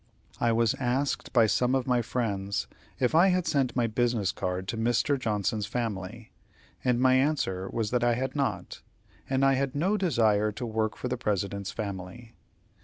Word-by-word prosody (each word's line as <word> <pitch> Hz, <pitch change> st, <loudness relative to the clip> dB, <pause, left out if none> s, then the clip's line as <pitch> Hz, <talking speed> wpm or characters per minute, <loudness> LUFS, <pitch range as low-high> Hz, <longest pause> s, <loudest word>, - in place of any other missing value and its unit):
I 120 Hz, -, +2 dB
was 115 Hz, -1 st, +2 dB
asked 130 Hz, +2 st, -1 dB
by 115 Hz, -3 st, +5 dB
some 125 Hz, +4 st, +2 dB
of 130 Hz, -2 st, 0 dB
my 125 Hz, -2 st, +2 dB
friends 100 Hz, -5 st, -2 dB, 0.3 s
if 125 Hz, +1 st, +1 dB
I 170 Hz, +4 st, +6 dB
had 180 Hz, -2 st, +2 dB
sent 135 Hz, -4 st, 0 dB
my 120 Hz, -2 st, +2 dB
business 115 Hz, -3 st, 0 dB
cards 90 Hz, 0 st, -3 dB
to -, -, -5 dB
Mr. 120 Hz, +5 st, +1 dB
Johnson's 105 Hz, -2 st, -1 dB
family, 110 Hz, -1 st, -4 dB, 0.5 s
and 125 Hz, -2 st, +2 dB
my 130 Hz, 0 st, +4 dB
answer 130 Hz, -9 st, +1 dB
was 110 Hz, -2 st, -2 dB
that 120 Hz, -1 st, +1 dB
I 120 Hz, -1 st, +3 dB
had 130 Hz, +2 st, -3 dB
not, 140 Hz, -2 st, -2 dB, 0.5 s
as 135 Hz, 0 st, +1 dB
I 135 Hz, 0 st, +5 dB
had 135 Hz, +1 st, -1 dB
no 190 Hz, +8 st, +1 dB
desire 110 Hz, -, +2 dB
to 115 Hz, +4 st, -5 dB
work 110 Hz, -1 st, -1 dB
for -, -, -4 dB
the 125 Hz, 0 st, -2 dB
President's 100 Hz, -3 st, -2 dB
family. 105 Hz, +3 st, -6 dB
120 Hz, 180 wpm, -28 LUFS, 105-130 Hz, 0.5 s, I